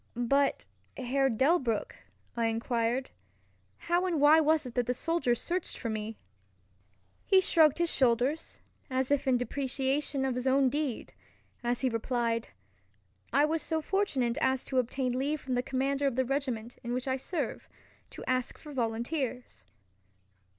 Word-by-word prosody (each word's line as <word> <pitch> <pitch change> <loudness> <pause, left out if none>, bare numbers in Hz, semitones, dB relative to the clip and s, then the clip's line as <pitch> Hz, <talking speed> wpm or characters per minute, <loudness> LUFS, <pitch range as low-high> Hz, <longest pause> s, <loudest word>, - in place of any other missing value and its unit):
"But 275 +4 +1 0.3
Herr 270 +1 +1
Delbruck," 260 -2 +1 0.4
I 230 -1 +1
enquired, 230 +2 -1 0.7
"how 350 +2 0
and 335 -4 0
why 295 +2 +7
was 315 -1 +3
it 250 - -7
that 245 -2 0
the 250 - 0
soldiers 290 -6 0
searched 355 0 -3
for 230 - -3
me?" 215 0 -4 1.1
He 385 - +5
shrugged 320 -5 +4
his 340 -1 +1
shoulders, 255 +4 +1 0.3
as 260 +1 -1
if 285 -1 +1
in 255 -1 +4
depreciation 270 +2 -1
of 265 - 0
his 250 +1 -2
own 265 0 +4
deed, 285 -3 -3 0.5
as 240 0 0
he 260 - +2
replied, 230 0 -1 0.8
"I 285 +4 +4
was 320 +1 0
so 320 -1 -1
fortunate 295 -9 0
as 260 -2 +1
to 260 - +1
obtain 255 +1 -1
leave 295 +3 0
from 260 -1 -4
the 245 - +2
commander 275 +2 0
of 265 - -1
the 260 0 +1
regiment 250 -4 -3
in 240 0 -3
which 250 +2 -2
I 260 0 +1
serve, 335 +6 -4 0.4
to - - -9
ask 255 -1 0
for 300 -2 -11
volunteers." 240 - -3
260 Hz, 155 wpm, -30 LUFS, 240-290 Hz, 1.1 s, why